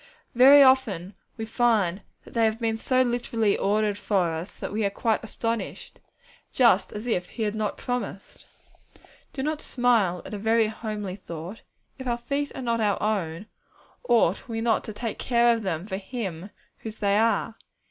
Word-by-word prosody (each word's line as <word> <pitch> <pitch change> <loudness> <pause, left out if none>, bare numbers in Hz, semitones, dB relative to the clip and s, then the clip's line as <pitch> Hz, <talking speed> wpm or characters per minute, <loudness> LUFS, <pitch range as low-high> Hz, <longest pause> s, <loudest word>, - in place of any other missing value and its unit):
Very 275 +3 +8
often 230 -9 +2 0.2
we 225 - -4
find 215 -5 +1 0.2
that - - -14
they 230 - +2
have 220 +1 0
been 225 -2 0
so 255 +3 +2
very - - -2
literally 235 -3 0
ordered 205 0 0
for 185 -6 +1
us 165 +4 -6
that - - -5
we 215 +2 -1
are 200 - +2
quite 220 +2 -1
astonished, 230 +1 -4 0.5
just 225 -7 +3
as 210 +2 -6
if 180 -7 -1
He 225 - -4
had 210 -1 -1
not 215 -1 -2
promised! 245 -6 -5 0.8
Do 265 - -4
not 305 +1 -2
smile 225 -9 +1
at - - -8
a 205 - -4
very 220 +1 +2
homely 210 -4 -5
thought! 170 +2 -8 0.4
If 260 - -6
our 240 -1 0
feet 280 +4 -3
are 260 - -5
not 230 -1 0
our 205 -2 +1
own, 190 -4 -2 0.6
ought 225 -5 +3
we 225 -2 -3
not 225 -1 +1
to 215 - -6
take 220 +1 -5
care 235 -1 +3
of 225 - -4
them 180 -4 -3
for 190 -2 -4
Him 195 -4 -5 0.3
whose 220 -1 -7
they 200 -2 +1
are? 225 0 +1
220 Hz, 180 wpm, -26 LUFS, 200-240 Hz, 0.8 s, Very